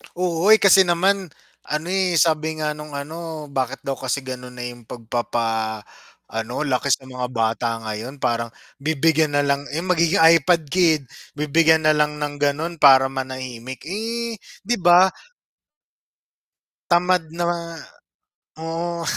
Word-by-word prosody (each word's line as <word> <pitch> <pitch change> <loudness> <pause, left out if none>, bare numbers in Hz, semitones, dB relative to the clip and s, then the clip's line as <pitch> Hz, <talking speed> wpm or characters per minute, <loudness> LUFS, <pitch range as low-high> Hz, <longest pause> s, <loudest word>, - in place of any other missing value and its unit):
Oo, 175 0 -1
eh, 220 - +9
kasi 195 -3 +5
naman 190 +3 +1 0.4
ano, 155 +2 -3
eh, 190 -2 +1
sabi 160 -1 +2
nga 150 0 0
nung 150 -1 -8
ano, 155 +1 -7
bakit 130 -1 -3
daw 135 -1 -4
kasi 130 +1 -2
gano'n 125 -1 -8
na 125 - -6
yung 120 -2 -9
pagpapa 115 -2 -3 0.5
ano 115 +6 -3
laki 135 0 -1
sa 130 0 +1
mga 125 -1 -5
bata 115 -1 -1 0.2
ngayon 110 +6 -6
parang 115 -2 -1 0.3
bibigyan 155 0 +1
nalang, 140 0 0
eh, 165 - -2
magiging 170 -1 +2
iPad 165 -1 +4
kid. 165 -5 +3 0.3
Bibigyan 160 +2 +3
nalang 150 -1 +2
ng 145 -1 -5
gano'n 150 +4 -1
para 135 -2 +7
manahimik. 130 -1 -6
Eh, 225 +4 -4 0.3
'di 240 +4 +1
ba 175 +2 +6 1.8
Tamad 180 0 +3
na 175 +1 -3
nga, 175 - -1 1.0
oo. 170 +1 -4
150 Hz, 135 wpm, -21 LUFS, 130-170 Hz, 1.8 s, eh